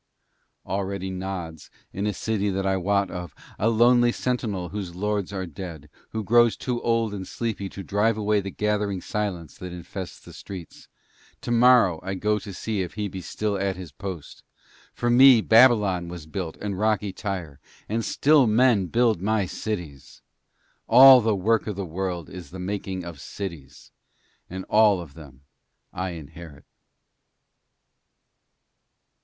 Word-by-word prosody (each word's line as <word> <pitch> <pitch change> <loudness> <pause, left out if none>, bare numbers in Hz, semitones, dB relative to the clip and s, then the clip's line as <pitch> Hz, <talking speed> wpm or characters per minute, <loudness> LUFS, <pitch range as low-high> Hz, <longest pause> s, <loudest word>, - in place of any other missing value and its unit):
Already 95 -1 -3
nods, 90 -4 -6 0.2
in 100 +3 -2
a 105 - -1
city 105 -2 -1
that 95 0 -2
I 95 0 +2
wot 100 +1 0
of, 90 -4 -7 0.2
a 110 - +2
lonely 120 +1 +4
sentinel 110 -9 -2
whose 95 -3 -6
lords 105 +1 -2
are 95 -2 -3
dead, 80 -3 -9 0.2
who 110 -1 -4
grows 120 +1 +4
too 125 -2 -3
old 115 -2 0
and 95 -2 -6
sleepy 110 -4 -4
to 100 - -8
drive 105 +3 +1
away 105 0 +1
the 100 - -5
gathering 105 -1 -1
silence 90 -7 -4
that 90 -1 -7
infests 90 +1 -8
the - - -14
streets; 90 -4 -10 0.5
tomorrow 120 -7 +4
I 95 +1 -4
go 105 +2 0
to 100 - -9
see 105 +2 -3
if 90 -2 -5
he 105 -1 -2
be 95 0 -7
still 100 +3 -3
at 95 0 -1
his 90 -3 -9
post. 95 -7 -8 0.5
For 120 0 -1
me 130 0 +8
Babylon 110 -6 +4
was 85 -2 -8
built, 80 0 -5
and 100 -3 -4
rocky 105 -2 0
Tyre; 90 -9 -5 0.3
and 115 +2 -1
still 145 0 +4
men 110 -3 +3
build 115 -3 +2
my 105 0 +1
cities! 85 -9 -6 0.6
All 130 +2 +9
the 110 -1 +1
Work 110 +5 +1
of 105 - -3
the 100 0 -4
World 90 0 -4
is 90 -2 -10
the 95 - -9
making 95 -1 -4
of 85 -5 -8
cities, 80 -9 -8 0.6
and 95 +1 -6
all 105 -3 +4
of 80 -5 -9
them 70 -4 -14 0.5
I 95 0 -3
inherit.' 80 -1 -11
100 Hz, 155 wpm, -25 LUFS, 90-110 Hz, 0.6 s, All